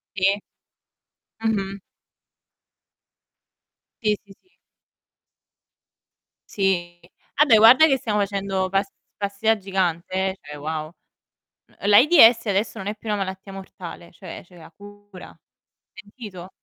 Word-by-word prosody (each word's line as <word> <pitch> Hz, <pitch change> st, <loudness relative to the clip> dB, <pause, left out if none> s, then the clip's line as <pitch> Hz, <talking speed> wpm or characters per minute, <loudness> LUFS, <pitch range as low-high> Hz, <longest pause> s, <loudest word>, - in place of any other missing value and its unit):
Sì. 190 Hz, 0 st, 0 dB, 1.2 s
Mh-mh. 195 Hz, -3 st, -2 dB, 2.2 s
Sì, 210 Hz, -2 st, +1 dB
sì, 200 Hz, -1 st, -17 dB
sì. 370 Hz, -, -38 dB, 1.9 s
Sì. 175 Hz, -3 st, -1 dB, 0.4 s
Vabbè, 285 Hz, -6 st, +5 dB
guarda 245 Hz, +8 st, +8 dB
che 270 Hz, -2 st, +2 dB
siamo 210 Hz, -4 st, -2 dB
facendo 195 Hz, -2 st, -2 dB
pas 195 Hz, +1 st, 0 dB, 0.3 s
passi 200 Hz, +1 st, -6 dB
da 220 Hz, 0 st, +4 dB
gigante, 185 Hz, -3 st, -2 dB
eh, 190 Hz, 0 st, -1 dB
cioè 150 Hz, 0 st, -10 dB
wow. 155 Hz, +1 st, -5 dB, 0.8 s
N -, -, -26 dB
ehm, 205 Hz, -, -2 dB
l'AIDS 235 Hz, 0 st, +6 dB
adesso 200 Hz, +2 st, -1 dB
non 195 Hz, -, -6 dB
è 210 Hz, -, -3 dB
più 220 Hz, -, -14 dB
una 210 Hz, -1 st, 0 dB
malattia 190 Hz, 0 st, -6 dB
mortale, 180 Hz, -3 st, -10 dB
cioè 175 Hz, 0 st, -10 dB
c'è 180 Hz, 0 st, -19 dB
la 165 Hz, -, -14 dB
cura. 205 Hz, -2 st, -14 dB, 0.6 s
Sentito? 205 Hz, -4 st, -11 dB
195 Hz, 120 wpm, -22 LUFS, 185-210 Hz, 2.2 s, guarda